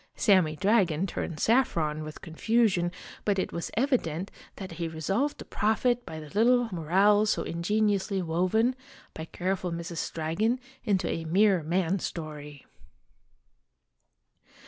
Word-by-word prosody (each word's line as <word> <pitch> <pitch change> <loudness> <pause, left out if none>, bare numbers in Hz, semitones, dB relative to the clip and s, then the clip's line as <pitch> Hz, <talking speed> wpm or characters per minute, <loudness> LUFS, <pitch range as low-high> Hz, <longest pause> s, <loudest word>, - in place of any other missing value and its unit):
Sammy 185 -7 +3
Dragon 190 -3 +2
turned 165 -4 -4
saffron 165 - +1
with 155 -1 -9
confusion, 185 +1 +1 0.3
but 205 -2 +1
it 185 - -2
was 170 - -4
evi 260 +1 +3
dent 165 +4 -5 0.2
that 190 -3 -8
he 165 0 -4
resolved 195 - -1
to - - -9
profit 240 +3 0
by 160 - -6
the 150 -1 -10
little 240 +4 +3
moral 195 +5 +3
so - - +1
ingeniously 200 +2 0
woven, 185 +8 +1 0.4
by 160 - -6
careful 185 +1 -2
Mrs. 170 0 -4
Dragon, 170 +10 0 0.2
into 200 -5 +1
a 165 - -3
mere 190 +2 +3
man 180 +4 0
story. 150 -4 -7
185 Hz, 130 wpm, -28 LUFS, 165-215 Hz, 0.4 s, Sammy